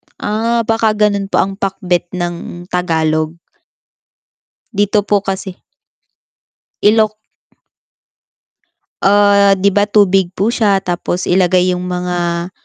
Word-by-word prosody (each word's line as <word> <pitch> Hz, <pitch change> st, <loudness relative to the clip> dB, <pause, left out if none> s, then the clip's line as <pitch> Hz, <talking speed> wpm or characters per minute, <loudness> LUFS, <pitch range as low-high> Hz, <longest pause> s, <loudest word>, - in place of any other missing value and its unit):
Ah, 230 Hz, +2 st, -1 dB
baka 225 Hz, -1 st, +1 dB
ganun 205 Hz, -2 st, +1 dB
po -, -, -1 dB
ang 195 Hz, +1 st, -6 dB
pakbet 185 Hz, -3 st, -1 dB
ng 175 Hz, 0 st, -5 dB
Tagalog. 160 Hz, -2 st, -1 dB, 1.4 s
Dito 205 Hz, 0 st, +1 dB
po 205 Hz, -1 st, 0 dB
kasi 190 Hz, -1 st, -5 dB, 1.2 s
Ilok 215 Hz, 0 st, +3 dB, 1.8 s
Ah, 200 Hz, 0 st, +4 dB
'di 195 Hz, +1 st, +2 dB
ba 205 Hz, +1 st, +1 dB
tubig 195 Hz, -3 st, +2 dB
po 200 Hz, +4 st, 0 dB
siya 205 Hz, -5 st, +1 dB
tapos 175 Hz, 0 st, -3 dB
ilagay 180 Hz, 0 st, +3 dB
yung 180 Hz, -, -5 dB
mga 175 Hz, -1 st, -2 dB
195 Hz, 105 wpm, -15 LUFS, 180-205 Hz, 1.8 s, Ah